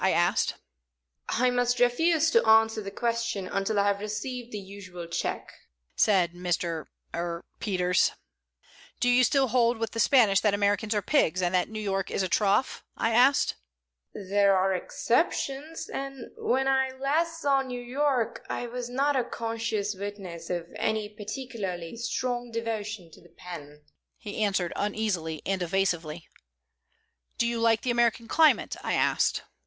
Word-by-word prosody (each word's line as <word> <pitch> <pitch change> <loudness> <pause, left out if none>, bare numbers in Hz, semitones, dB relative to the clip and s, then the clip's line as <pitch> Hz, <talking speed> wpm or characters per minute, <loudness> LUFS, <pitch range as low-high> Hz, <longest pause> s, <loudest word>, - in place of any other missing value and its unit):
I - - +4
asked. - - +2 0.7
"I 250 +1 +2
must 245 0 +1
refuse 320 +6 +3
to 465 - +4
answer 220 0 +4
that 200 -1 -8
question 235 -4 -1
until 200 +2 0
I 200 - +3
have 200 0 +1
received 240 +4 -5
the 210 - -4
usual 190 -3 -9
check," 170 - -3 0.4
said 180 -5 +3
Mr. 175 -2 -2 0.3
er 170 0 -3
Peters. 180 -4 +2 0.9
"Do 245 - +1
you 245 +1 +5
still 270 0 +3
hold 235 0 +3
with 225 -1 -3
the 230 - -5
Spanish 220 -5 +5
that 210 -2 +2
Americans 205 +2 +1
are 205 - 0
pigs, 185 - +2
and 175 +1 0
that 180 -1 +2
New 220 0 -5
York 195 -2 -2
is - - -1
a - - 0
trough?" 205 +7 +1
I 225 - +1
asked. 255 +4 +4 0.5
"There 200 0 +2
are 190 +1 +2
exceptions, 275 - -1
and 275 -2 -6
when 265 +2 0
I 265 0 +2
last 330 +5 0
saw 280 -3 +2
New 255 -2 -5
York 255 -1 -1
I - - -3
was 240 0 -5
not 275 +3 +1
a 255 - +2
conscious 225 -3 -2
witness 190 -4 -7
of 175 -2 -2
any 215 -1 -1
particularly 210 -5 -5
strong 245 +1 -2
devotion 220 -5 -4
to - - -16
the 175 - -19
pen," 150 -4 -10 0.3
he 210 -1 -6
answered, 195 -4 0
uneasily 200 -7 -2
and 195 -1 -1
evasively. 175 -3 -1 1.1
"Do 235 - +2
you 235 0 -1
like 230 -1 +3
the 250 - 0
American 235 -1 +1
climate?" 315 +5 +3
I - - -1
asked. - - +1
220 Hz, 155 wpm, -27 LUFS, 195-245 Hz, 1.1 s, you